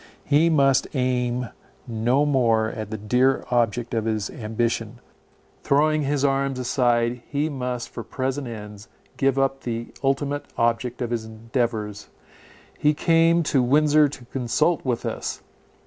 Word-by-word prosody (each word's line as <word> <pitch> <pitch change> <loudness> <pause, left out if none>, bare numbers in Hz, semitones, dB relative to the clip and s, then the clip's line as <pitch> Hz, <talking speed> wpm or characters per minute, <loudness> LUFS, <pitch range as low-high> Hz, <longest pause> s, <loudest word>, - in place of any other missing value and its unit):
He 150 +3 +4
must 135 -4 +3
aim 125 -1 0 0.4
no 120 +5 +1
more 115 -6 +2
at 110 -3 -6
the 110 - -4
dear 125 +6 +2
object 120 0 0
of 110 -1 0
his 110 -2 -1
ambition; 115 0 -2 0.6
throwing 155 +2 +2
his 145 0 0
arms 135 -1 +1
aside, 120 -1 +1
he 150 +2 -1
must 125 -4 -3
for 115 - -7
present 130 +4 -3
ends 105 -2 -9 0.3
give 135 -1 +2
up 135 0 +1
the 115 -1 -4
ultimate 140 +1 0
object 120 +2 0
of 120 - -4
his 115 -2 -2
endeavours. 110 -2 -3 0.7
He 150 0 +3
came 165 +2 +3
to 140 -3 +2
Windsor 150 +3 +4
to 130 -3 -10
consult 135 +7 0
with 125 -3 -2
us. - - -4
125 Hz, 140 wpm, -24 LUFS, 115-140 Hz, 0.7 s, He